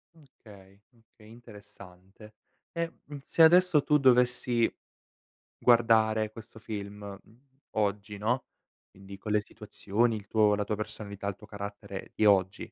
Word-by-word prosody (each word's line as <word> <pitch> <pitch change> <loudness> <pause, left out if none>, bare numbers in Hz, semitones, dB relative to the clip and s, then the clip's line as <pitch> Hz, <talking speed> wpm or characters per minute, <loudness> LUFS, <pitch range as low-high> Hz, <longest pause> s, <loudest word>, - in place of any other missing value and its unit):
Okay, 100 -10 -18
okay 115 -2 -21
interessante. 105 -3 -15 0.4
E, 170 -1 -3
mhmm, 145 0 -9
se - - 0
adesso 175 -2 +5
tu 150 - +3
dovessi 125 -3 +3 0.9
guardare 110 -2 +3
questo 110 0 -13
film, 105 -2 -7 0.3
mhmm, 115 +3 -24 0.3
oggi 105 0 -2
no, 120 +5 -1 0.4
quindi 100 +1 -13
con 105 +2 -6
le 105 0 +2
situazioni 110 +3 -2
il 100 -2 -9
tuo 105 -1 +3
la 105 - -2
tua 105 - -3
personalità, 105 -1 -7
il 100 - -3
tuo 105 - -16
carattere 100 -1 -8
di 110 - 0
oggi 95 -2 +2
110 Hz, 135 wpm, -28 LUFS, 100-120 Hz, 0.9 s, adesso